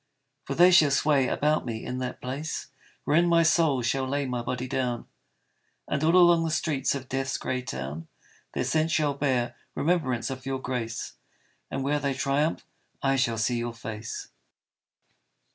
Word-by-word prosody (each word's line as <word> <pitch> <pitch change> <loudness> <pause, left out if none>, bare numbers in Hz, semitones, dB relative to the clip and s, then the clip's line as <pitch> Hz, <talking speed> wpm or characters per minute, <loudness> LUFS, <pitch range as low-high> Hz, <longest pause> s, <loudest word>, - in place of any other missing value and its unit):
For 135 - -3
they 180 +3 +7
shall 160 -5 +6
sway 140 -1 +3
about 150 +1 +1
me 115 -3 -5
in 125 +1 -3
that 125 -1 -4
place 140 +5 -4 0.3
Wherein 170 +4 +3
my 170 -1 +5
soul 155 -5 +3
shall 130 +2 0
lay 140 +1 -1
my 125 -2 -2
body 125 +1 -3
down, 125 -2 -2 0.8
And 140 - -1
all 165 +3 +4
along 175 -2 +6
the 165 - -1
streets 150 -4 0
of 130 -2 -6
Death's 135 0 -2
grey 130 0 -2
town 75 - -6 0.5
Their - - 0
scent 155 +5 +1
shall 155 -4 +2
bear 130 -4 0 0.2
remembrance 140 -7 0
of 130 -1 -6
your 135 0 -1
grace, 125 -3 -4 0.6
And 135 - -3
where 145 +2 +1
they 140 -1 -1
triumph 140 +4 0 0.4
I 135 0 +3
shall 120 -4 +1
see 120 +2 0
your 120 0 -4
face. 115 0 -6
135 Hz, 165 wpm, -27 LUFS, 125-150 Hz, 0.8 s, they